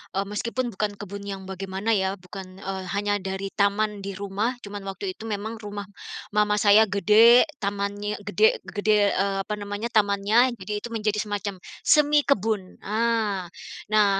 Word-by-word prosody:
eee, 195 - +1
meskipun 235 +5 -3
bukan 205 0 -2
kebun 200 0 -7
yang 195 -1 -5
bagaimana 190 +3 -3
ya 190 -2 +1
bukan 185 0 -10
eee, 190 0 -5
hanya 205 0 0
dari 195 0 -4
taman 205 0 +1
di 195 0 -6
rumah 200 +5 -2
cuman 205 0 -6
waktu 195 0 -4
itu 220 +4 -9
memang 220 +1 -4
rumah 205 -1 -6 0.5
mama 210 0 +2
saya 210 +1 +6
gede, 215 +4 +6 0.2
tamannya 205 +1 -2
gede 205 +2 +2
gede 205 +2 +2
eee, 195 +1 0
apa 210 - -4
namanya, 205 +3 -4
tamannya 215 +3 +3
jadi 210 0 -4
itu 220 - -7
menjadi 215 -2 -1
semacam 205 -1 -3 0.3
semi 295 -1 +5
kebun, 215 -8 -1
ah. 215 -3 0 0.5
Nah, 205 -2 +4
205 Hz, 155 wpm, -25 LUFS, 195-215 Hz, 0.5 s, saya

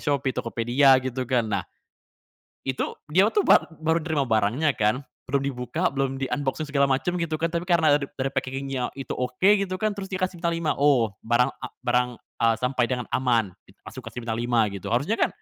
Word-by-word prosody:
Shopee, 140 -2 0
Tokopedia, 120 +4 +3
gitu 130 0 -2
kan. 125 -3 +2
Nah, 105 - -1 1.0
itu 130 -1 -2 0.2
dia 185 +5 +5
tuh, 415 - +4
bar - - +5 0.2
baru 160 +1 +2
nerima 155 -3 -1
barangnya, 115 +6 +2
kan. 110 +5 +1 0.3
Belum 140 +1 +1
dibuka, 140 +6 -1
belum 135 -1 -2
di-unboxing 145 +2 -2
segala 140 -1 +3
macem, 135 +6 0
gitu 165 -2 -2
kan, 165 +1 -1
tapi 170 +1 -2
karena 160 -4 +4
dari 135 -1 -4
packaging-nya 135 -1 -3
itu 135 -1 -8
oke, 125 +10 +1
gitu 195 -2 -2
kan, 215 +3 0
terus 200 -1 -6
dia 190 - -3
kasih 185 -1 -1
bintang 170 -1 0
5. 165 -3 0
"Oh, 130 -7 +4 0.2
barang 120 +2 +3
a - - -4 0.2
barang 125 0 +2 0.3
a - - +4
sampai 125 0 0
dengan 125 -1 -2
aman," 115 -6 +1 0.2
gitu. 95 - -20
Langsung 130 - -8
dikasih 115 +2 -6
bintang 115 -1 -2
5, 120 -1 +2
gitu. 100 -2 -6
Harusnya 140 - 0
kan, - - +4
135 Hz, 195 wpm, -25 LUFS, 125-155 Hz, 1.0 s, dia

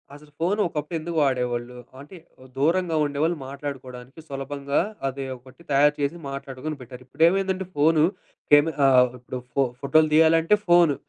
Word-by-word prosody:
అసలు 150 0 -16
ఫోను 190 +6 +1
ఒకప్పుడు 155 0 -5
ఎందుకు 165 +1 -5
వాడేవాళ్లు? 125 -2 -1 0.3
అంటే 150 +7 -13 0.4
దూరంగా 165 +4 +1
ఉండేవాళ్ళు 150 +4 -1
మాట్లాడుకోవడానికి 135 -1 -8
సులభంగా 140 0 -3 0.3
అది 135 +1 -4
ఒకటి 130 +6 -18
తయారు 145 +2 +4
చేసి 145 +3 -1
మాట్లాడుకొని 140 +2 -6
పెట్టారు. 125 0 -11
ఇప్పుడేంమైందంటే, 190 +6 +1
ఫోను 155 +1 +3 0.5
కేమె 145 +2 +6
ఆహ్, 125 -2 +5
ఇప్పుడు 125 +1 -7 0.2
ఫో 140 - +3 0.2
ఫోటోలు 155 +3 +3
తీయాలంటే 160 +4 +5
ఫోను, 175 -4 +5
145 Hz, 135 wpm, -24 LUFS, 135-160 Hz, 0.5 s, కేమె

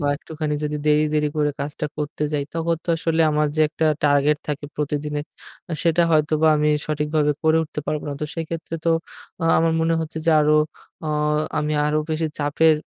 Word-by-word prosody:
বা 145 - -1
একটুখানি 155 -1 -4
যদি 150 0 -2
দেরি, 150 0 +4
দেরি 150 0 +2
করে 150 -1 +2
কাজটা 150 +2 -3
করতে 150 0 -4
যাই 145 -1 0
তখন 165 0 0
তো - - -16
আসলে 165 0 0
আমার 150 0 +2
যে - - +2
একটা 160 0 -2 0.2
টার্গেট 145 0 +3
থাকে 145 0 -3
প্রতিদিনের, 150 0 -2 0.5
আ - - -3
সেটা 170 0 +3
হয়তোবা 155 0 +3
আমি 150 0 +2 0.2
সঠিকভাবে 150 0 +1
করে 160 0 +4
উঠতে 150 -1 -5
পারবোনা। 150 -1 -2
তো - - -1
সেক্ষেত্রে 165 0 -5
তো 165 - +3 0.5
আ - - +1
আমার 165 0 +2
মনে 165 0 +2
হচ্ছে 160 0 -4
যে 165 - +5
আরো 150 +1 +4 0.5
অ - - -1 0.5
আমি 150 0 -1
আরো 150 +1 +1
বেশি 160 +1 0
চাপের 155 +2 +3
150 Hz, 185 wpm, -22 LUFS, 150-160 Hz, 0.5 s, যে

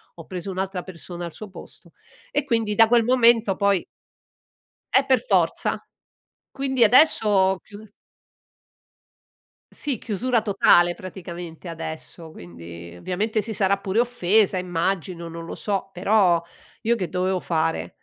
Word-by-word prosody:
ho 165 - -11
preso 185 +1 -5
un'altra 190 -1 -3
persona 175 -1 -8
al 170 - -6
suo 215 -2 -9
posto. - - -12 0.4
E 290 -1 0
quindi 225 -5 0
da 225 +1 +6
quel 235 -1 +4
momento 235 -5 +4
poi 200 -2 +1 1.1
Eh - - +4
per - - +3
forza, - - +1 0.7
quindi 265 -2 -1
adesso 245 -1 +5
ho 190 -2 +3
chiu 205 +4 -13 1.9
Sì, 275 -7 -3
chiusura 235 +2 0
totale 175 -4 +4
praticamente, 175 -2 -9
adesso, 160 0 -7
quindi 85 - -11
ovviamente 210 - -2
si 225 - -3
sarà 200 -1 +2
pure 195 +2 -3
offesa 220 -4 +2
immagino, 180 -1 -2
non 165 0 -8
lo - - -7
so, 195 -2 -3
però 185 -2 +3 0.4
io 235 +2 +2
che 185 -4 -3
dovevo 185 0 -1
fare? 90 - -1
190 Hz, 135 wpm, -23 LUFS, 175-220 Hz, 1.9 s, da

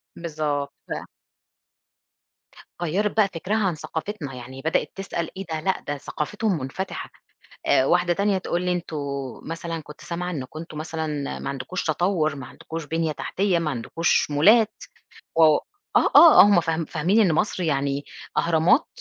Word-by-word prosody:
بالضبط 150 -4 -3
ف - - -14 1.9
غيّرِت 200 +6 0
بقى 210 - +5
فِكرها 185 +6 -1
عن 175 - -1
ثقافتنا 160 -1 -5
يعني 130 +1 -9
بدأِت 160 +3 0
تسأل 180 -4 -3
إيه 195 - -5
ده 160 - -1
لأ 190 +4 -1
ده 145 - -2
ثقافتهم 195 +8 -2
منفتحة 135 +9 -5 0.6
آآ، 130 - +4
واحدة 175 +3 +3
تانية 200 +1 +1
تقول 175 -1 -2
لي 180 0 0
أنتم 175 -3 -3 0.5
مثلًا 165 0 -4
كنت 150 0 -13
سامعة 180 +1 -4
إنكم 145 0 -6
أنتم 165 -2 -8
مثلًا 160 +1 -3 0.3
ما - - -4
عندكوش 140 +7 -4
تطوّر، 155 -1 +1
ما 135 -3 -8
عندكوش 165 +3 -7
بنية 160 +1 -1
تحتية، 180 +4 0
ما 165 - -1
عندكوش 150 +5 0
مولات 215 +10 +5 0.7
آه 155 -2 +6 0.6
آه 335 -2 +10
هم 200 -3 +6
فاهم 165 0 -1
فاهمين 180 +11 +1
إن 185 -6 +4
مصر 180 +3 0
يعني 140 -2 0 0.3
أهرامات، 170 - +3
165 Hz, 150 wpm, -24 LUFS, 150-185 Hz, 1.9 s, آه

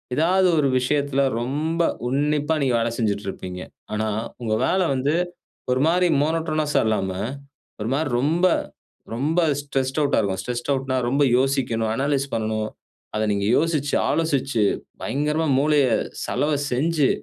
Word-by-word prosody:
ஏதாவது 185 +4 +3
ஒரு 145 -2 +3
விஷயத்துல 140 +1 0 0.2
ரொம்ப 155 +7 -1 0.3
உன்னிப்பா 150 +3 +1
நீங்க 130 -2 +1
வேலை 115 0 0
செஞ்சிட்டு 105 -3 -1
இருப்பீங்க. 90 -1 -6 0.3
ஆனா, 110 +1 -1 0.3
உங்க 110 -2 -1
வேலை 185 0 +2
வந்து 135 +3 0 0.6
ஒரு 125 +1 +2
மாரி 180 +2 +3
மோனோட்டோனஸ்சா 155 -1 0
இல்லாம 105 -3 0 0.7
ஒரு 105 - -2
மாரி 150 +1 0
ரொம்ப, 165 +7 +2 0.7
ரொம்ப 150 +8 +1 0.2
ஸ்ட்ரெஸ்ட் 135 -1 -2
அவுட் 140 - +1
ஆகும். 95 -3 0
ஸ்ட்ரெஸ்ட் 120 +6 -4
ஆட்னா 135 -1 -1
ரொம்ப 140 +3 +2 0.2
யோசிக்கணும், 125 -5 0
அனலீஸ் 135 +2 0
பண்ணனும். 110 -1 -1 0.4
அத 110 0 0
நீங்க 100 0 -1
யோசிச்சு, 150 -3 +1 0.2
ஆலோசிச்சு, 135 -8 0 0.4
பயங்கரமா 150 +3 0
மூளைய 145 -2 +3 0.4
சலவ 150 +1 0 0.2
செஞ்சு, 150 +2 +2
140 Hz, 130 wpm, -23 LUFS, 120-155 Hz, 0.7 s, ஏதாவது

